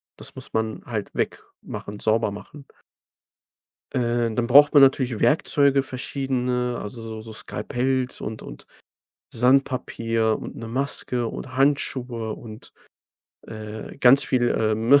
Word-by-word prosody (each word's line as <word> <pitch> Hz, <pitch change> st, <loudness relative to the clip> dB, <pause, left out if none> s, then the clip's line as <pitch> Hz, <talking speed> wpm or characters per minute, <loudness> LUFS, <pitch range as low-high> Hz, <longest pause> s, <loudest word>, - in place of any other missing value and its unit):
Das -, -, -8 dB
muss -, -, -10 dB
man 110 Hz, -1 st, -1 dB
halt 110 Hz, -4 st, -4 dB
wegmachen, 105 Hz, 0 st, -5 dB
sauber 110 Hz, -1 st, +1 dB
machen. 140 Hz, +8 st, -10 dB, 1.3 s
Äh, 120 Hz, -2 st, +1 dB
dann 120 Hz, +1 st, 0 dB
braucht 145 Hz, +4 st, +7 dB
man 145 Hz, -, +7 dB
natürlich 130 Hz, -4 st, +3 dB
Werkzeuge 140 Hz, -2 st, +3 dB
verschiedene, 125 Hz, -2 st, -2 dB
also 115 Hz, +3 st, -7 dB
so 110 Hz, -1 st, -7 dB
so 110 Hz, 0 st, -10 dB
Skalpells 130 Hz, +3 st, -2 dB
und 110 Hz, 0 st, -5 dB
und -, -, -11 dB, 0.7 s
Sandpapier 115 Hz, -3 st, +1 dB
und -, -, -8 dB
'ne 115 Hz, -, -7 dB
Maske 125 Hz, -1 st, -2 dB
und 130 Hz, +2 st, -7 dB
Handschuhe 130 Hz, -5 st, 0 dB
und, 110 Hz, 0 st, -11 dB, 0.7 s
äh, 110 Hz, +1 st, -8 dB
ganz 135 Hz, +3 st, +6 dB
viel, 120 Hz, -2 st, +2 dB
ähm, 110 Hz, +5 st, +3 dB
120 Hz, 125 wpm, -24 LUFS, 110-135 Hz, 1.3 s, braucht